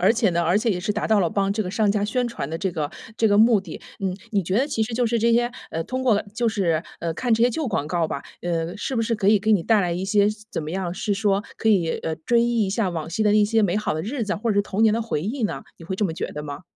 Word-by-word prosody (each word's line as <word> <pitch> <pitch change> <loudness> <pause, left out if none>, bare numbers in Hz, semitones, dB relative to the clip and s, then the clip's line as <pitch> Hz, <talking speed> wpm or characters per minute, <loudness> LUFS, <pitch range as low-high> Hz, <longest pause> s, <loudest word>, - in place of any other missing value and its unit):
而 190 +5 +5
且 225 -5 +2
呢， 170 0 0
而 175 +4 +2
且 225 +1 +1
也 180 - 0
是 210 +3 -1
达 215 - -2
到 220 - +4
了 175 -4 +2
帮 195 +1 0
这 215 - -2
个 185 - -2
商 210 -1 +2
家 205 0 +1
宣 240 +3 0
传 145 -11 -5
的 165 - -3
这 190 +2 -2
个 155 -3 -2 0.3
这 225 - +3
个 205 - +3
目 220 -1 +5
的。 175 -5 -9 0.2
嗯， 190 -2 -2
你 200 -4 0
觉 185 +4 0
得 265 - +3
其 255 - -2
实 230 - -5
就 245 +1 +1
是 235 0 +1
这 230 +1 +3
些， 240 +1 +2 0.2
呃， 165 - -1
通 255 +9 -4
过 215 -5 +3
就 235 0 +2
是， 175 -7 +1 0.2
呃， 165 -1 -2
看 235 +6 +1
这 230 - +1
些 245 - +5
旧 300 +5 -2
广 150 - -2
告 170 -1 0
吧， 140 - -4 0.2
呃， 170 +2 -2
是 260 - -3
不 230 - +1
是 230 0 0
可 200 -2 -1
以 210 -1 +5
给 220 - 0
你 205 -5 +5
带 220 -2 +4
来 175 -2 0
一 180 +2 -2
些 205 0 +3 0.2
怎 160 - -2
么 155 - -5
样， 180 -1 -3
是 205 - -1
说 200 0 +1
可 225 - 0
以， 175 -6 +3
呃， 160 - -2
追 235 +10 +1
忆 235 -2 +2
一 190 - -2
下 210 -1 0
往 165 -2 -4
昔 215 +5 0
的 210 - +4
那 210 0 +5
些 225 +2 +2
美 200 -1 +2
好 215 - -1
的 155 - -2
日 240 - -3
子， 210 -1 -1
或 230 +2 -1
者 205 - +1
是 205 - +3
童 205 +2 -1
年 215 - +4
的 230 - 0
回 220 -9 -2
忆 230 - -3
呢？ 210 - -2
你 165 - -11
会 190 +2 -4
这 210 - 0
么 165 - -1
觉 - - -3
得 150 0 -6
吗？ 145 +3 -7
205 Hz, 345 characters per minute, -23 LUFS, 175-225 Hz, 0.3 s, 而